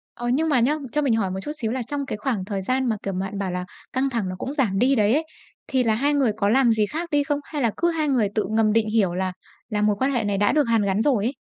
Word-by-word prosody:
Ờ, 240 - -4
nhưng 305 +6 +1
mà 265 -5 +3
nhớ, 290 +6 +2
cho 300 - +1
mình 265 -5 +2
hỏi 200 -4 0
một 190 - -4
chút 295 - -4
xíu, 225 0 -1
là 260 - -2
trong 280 +3 -4
cái - - -3
khoảng 210 -5 -2
thời 195 -1 -3
gian 255 +4 0
mà, 220 - 0
kiểu, 195 - -3
bạn 195 +1 -4
bảo 195 -2 -2
là 180 0 -3 0.3
căng 265 +1 0
thẳng 230 -6 -2
nó 185 - -4
cũng 265 - -4
giảm 240 -10 0
đi 260 +5 +4
đấy 215 -1 +3
ấy, 315 +3 +1 0.4
thì 260 -2 +1
là 220 - +2
hai 285 +6 +1
người 265 -6 +2
có 200 -1 +1
làm 250 +1 +4
gì 215 -1 +2
khác 335 +6 -5
đi 290 -1 +3
không? 290 -1 0
Hay 295 -4 -4
là 230 - +3
cứ 345 +1 +2
hai 315 -3 -1
người 240 -7 +2
tự 215 - 0
ngầm 220 -1 +2
định 225 -1 +2
hiểu 200 -6 +2
là 185 0 -1 0.4
là 210 -3 -1
mối 210 -1 +2
quan 265 +1 +1
hệ 235 -4 0
này 200 -1 0
đã 205 0 +3
được 300 -1 +3
hàn 225 -2 +3
gắn 200 +2 +1
rồi 240 -7 +2
ấy? 245 - 0
230 Hz, 315 wpm, -23 LUFS, 205-275 Hz, 0.4 s, đi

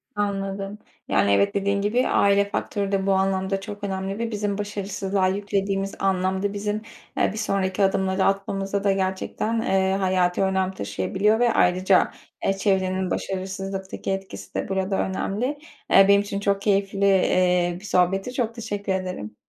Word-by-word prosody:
Anladım. 195 0 -2 0.3
Yani, 100 - +2
evet 100 0 +3
dediğin 200 0 +1
gibi 235 +5 +1
aile 200 0 +3
faktörü 200 -1 -2
de 195 -1 0
bu 195 - +4
anlamda 190 0 0
çok 205 0 -8
önemli 195 +1 -3
ve 230 0 -2
bizim 205 -1 -2
başarısızlığa 200 -2 -1
yüklediğimiz 195 0 -1
anlam 190 0 0
da 205 0 0
bizim, 210 +1 -2 0.4
eee, - - +3
bir - - -7
sonraki 195 -2 0
adımları 190 0 +1
atmamızda 195 0 -1
da 200 - +3
gerçekten, 195 +4 -1
eee, 190 -3 +1
hayati 185 -2 +1
önem 190 -1 +1
taşıyabiliyor 210 +3 0
ve 240 -1 +3
ayrıca, 185 +1 +3 0.3
eee, 195 - +3
çevrenin 190 -2 0
başarısızlıktaki 190 0 -4
etkisi 195 0 -6
de - - -2
burada 190 0 0
önemli. 195 +4 -1 0.5
Eee, 195 - +8
benim 200 0 +6
için 200 -1 -4
çok 200 0 0
keyifli, 200 -1 +1
eee, 180 -2 +3
bir 195 - -12
sohbetti, 195 +5 +1
çok 230 -3 -1
teşekkür 205 -4 -4
ederim. 180 - -4
195 Hz, 155 wpm, -24 LUFS, 190-200 Hz, 0.5 s, Eee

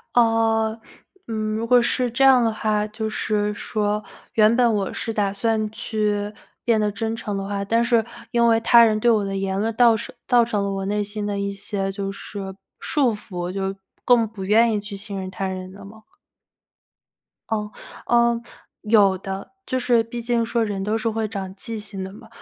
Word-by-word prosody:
呃， 225 -1 +3 0.5
嗯， 215 -1 -2
如 225 +1 -2
果 245 +1 +5
是 245 +1 +1
这 240 +4 +1
样 260 -2 +7
的 225 - +2
话， 215 -1 0
就 220 +1 -4
是 210 -1 0
说， 210 0 -2 0.3
原 220 +1 +5
本 240 -1 +4
我 195 -2 -2
是 225 - -3
打 205 -3 0
算 215 +1 0
去， 210 -2 -1 0.3
变 230 -3 +2
得 210 -1 +1
真 225 +2 -3
诚 210 -3 -4
的 195 - -3
话， 200 0 -3
但 230 +3 +2
是 235 -2 +2 0.2
因 235 0 +2
为 225 -1 +4
他 235 +1 +7
人 215 -1 +2
对 240 - +3
我 215 -3 +3
的 195 0 -3
言 195 0 -1
论 220 +2 -1
倒 235 -1 +5
是 230 - -7
造 240 -2 +5
成 210 -3 -1
了 200 - -1
我 195 0 -3
内 205 +1 0
心 205 +1 -4
的 205 -1 -2
一 200 0 -2
些 195 0 -3
就 195 0 -4
是， 195 -1 -7 0.2
束 265 -7 +1
缚， 180 -4 -5
就 195 0 -3 0.3
更 240 -2 +4
不 205 -3 -8
愿 225 +4 +4
意 210 - 0
去 205 0 -7
信 200 0 -5
任 185 0 -5
他 190 +1 -3
人 185 0 -5
的 200 +1 -12
吗？ 220 +2 -13 1.5
哦， 210 -1 -2 0.4
呃， 235 -1 +3 0.4
有 205 -3 +4
的。 195 +1 -6
就 255 - -1
是 240 -2 +3
毕 235 +1 -6
竟 235 0 0
说 230 0 0
人 200 -2 -3
都 210 +2 0
是 225 +1 -1
会 220 0 -1
长 195 -3 -5
记 225 +2 -6
性 200 -2 -7
的 190 - -6
嘛。 220 +3 -13
215 Hz, 215 characters per minute, -23 LUFS, 200-230 Hz, 1.5 s, 样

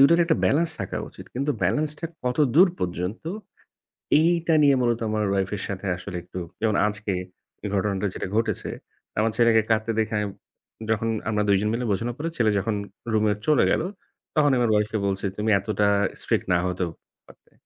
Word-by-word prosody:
দুইটার 170 +5 +6
একটা 165 -1 +2
balance 165 +4 +3
রাখা - - -4
উচিত। - - -12
কিন্তু 140 +4 -1
balance 150 0 +2
টা 165 - -3 0.2
কতদূর 145 +7 +4
পর্যন্ত, 90 +4 -3 1.0
এইটা 170 +1 +3
নিয়ে 140 -1 +6
মূলত 120 -1 +1
আমার 110 0 0
wife 95 0 -1
এর 95 - -6
সাথে 100 0 -5
আসলে 90 +1 -7
একটু, 90 +1 -8 0.2
যেমন 110 -2 +2
আজকে 105 -1 -2 0.5
এ - - -1
ঘটনাটা 100 0 0
যেটা - - -4
ঘটেছে। 115 - 0 0.5
আমার 110 +1 +3
ছেলেকে 115 -2 +5
কাঁদতে 110 +1 +2
দেখে 110 0 0
আমি 105 - 0 0.6
যখন 110 0 +1 0.2
আমরা 105 -1 +1
২জন 100 +1 +3
মিলে 120 +2 -1
বোঝানোর 115 +5 -2
পরে 160 +3 -2
ছেলে 115 -3 +3
যখন 110 +3 -1 0.4
রুমে 110 -1 +3
চলে 155 -1 +4
গেল, - - +2 0.5
তখন 150 -2 +4
আমার 120 -1 +2
wife 105 0 +1
কে 110 - 0
বলছি, 100 0 -1
"তুমি 105 +1 0
এতটা 105 +1 0 0.3
strict - - 0
না 90 - +4
হতেও 90 -1 -2 0.4
পারতে।" - - -20
110 Hz, 175 wpm, -25 LUFS, 100-135 Hz, 1.0 s, দুইটার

